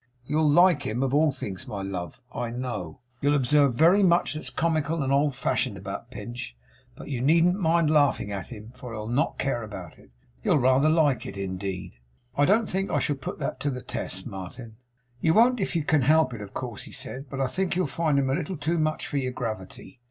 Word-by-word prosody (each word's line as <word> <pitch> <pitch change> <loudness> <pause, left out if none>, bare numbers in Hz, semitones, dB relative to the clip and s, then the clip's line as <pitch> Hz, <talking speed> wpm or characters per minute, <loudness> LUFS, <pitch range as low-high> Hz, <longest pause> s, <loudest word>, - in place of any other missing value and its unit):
You'll 150 +3 +2
like 175 0 +5
him 125 -1 -2
of 135 -1 -1
all 150 +1 +4
things, 95 -7 -6
my 100 -2 -4
love, 90 -4 -5
I 120 -1 -3
know. 125 0 -5 0.2
You'll 145 +1 +3
observe 140 -1 +3
very 170 +8 +5
much 175 -3 +3
that's 155 - -2
comical 160 -1 0
and 135 0 0
old 140 -1 +2
fashioned 125 -4 0
about 95 +5 -7
Pinch, 120 - -7 0.4
but - - -10
you 130 -4 -2
needn't 170 +7 +4
mind 165 -3 +3
laughing 145 -8 +2
at 95 -3 -4
him; 110 -1 -10
for 125 -2 -9
he'll 105 -1 -5
not 135 +8 0
care 135 -3 -1
about 95 -6 -9
it. - - -19 0.3
He'll - - +3
rather 130 +3 +4
like 155 -5 +2
it - - -7
indeed!' 95 -3 -5 0.4
'I 145 - +4
don't 215 +7 +4
think 195 +1 -1
I - - +1
shall 145 - 0
put 135 - -6
that - - -3
to 145 +1 -1
the 125 -3 -5
test, - - -3
Martin.' 110 +5 -8 0.4
'You 160 +5 +2
won't 245 +2 +5
if 190 - -2
you 165 - +1
can 155 -1 +2
help 155 +1 +4
it, 110 - -7
of 100 -1 -8
course,' 120 -5 -5
he - - -11
said, 130 +1 -5
'but 135 - -5
I 135 - +2
think 185 +8 -1
you'll 185 - +1
find 150 +1 0
him 135 -1 +2
a - - +2
little 175 +3 -2
too 160 +3 0
much 155 0 0
for 145 - -3
your 130 -2 -1
gravity. 110 0 -6
135 Hz, 220 wpm, -26 LUFS, 115-155 Hz, 0.4 s, like